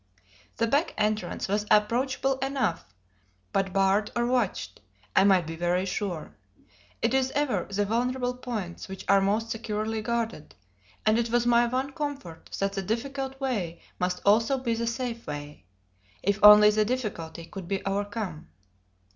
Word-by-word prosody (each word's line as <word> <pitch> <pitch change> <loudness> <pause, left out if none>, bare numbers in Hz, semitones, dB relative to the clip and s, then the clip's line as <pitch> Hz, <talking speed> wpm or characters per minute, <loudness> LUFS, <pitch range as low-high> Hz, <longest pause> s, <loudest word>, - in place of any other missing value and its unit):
The 230 - +2
back 285 +8 +1
entrance 210 -3 -1
was 205 +2 -1
approachable 260 +5 +2
enough, 270 -10 -1 0.7
but 195 -1 +1
barred 195 +2 +2
or 240 0 +1
watched, 245 - -1 0.3
I 190 - +6
might 190 -3 +4
be 165 +1 -5
very 175 +2 0
sure. 185 -4 -4 0.7
It 230 +2 +2
is 265 -1 +2
ever 290 -2 0
the 200 +1 0
vulnerable 250 +3 0
points 225 -9 -5
which 190 0 -8
are 200 0 +5
most 215 +4 0
securely 220 0 -2
guarded, 230 -8 -3 0.5
and 215 +1 +4
it 235 0 0
was 240 +1 +2
my 240 0 +4
one 260 +3 -1
comfort 280 - -6
that 195 0 0
the 195 - -2
difficult 265 +6 -3
way 210 -11 -2 0.2
must 180 0 -1
also 225 +6 +4
be 250 -3 -1
the 230 +1 -2
safe 235 0 -3
way, 145 - -7 0.6
if 200 +2 +1
only 210 0 +10
the 215 0 +2
difficulty 205 -9 -4
could 185 +1 -8
be 195 0 -2
overcome. 200 -4 -3
215 Hz, 155 wpm, -27 LUFS, 195-245 Hz, 0.7 s, only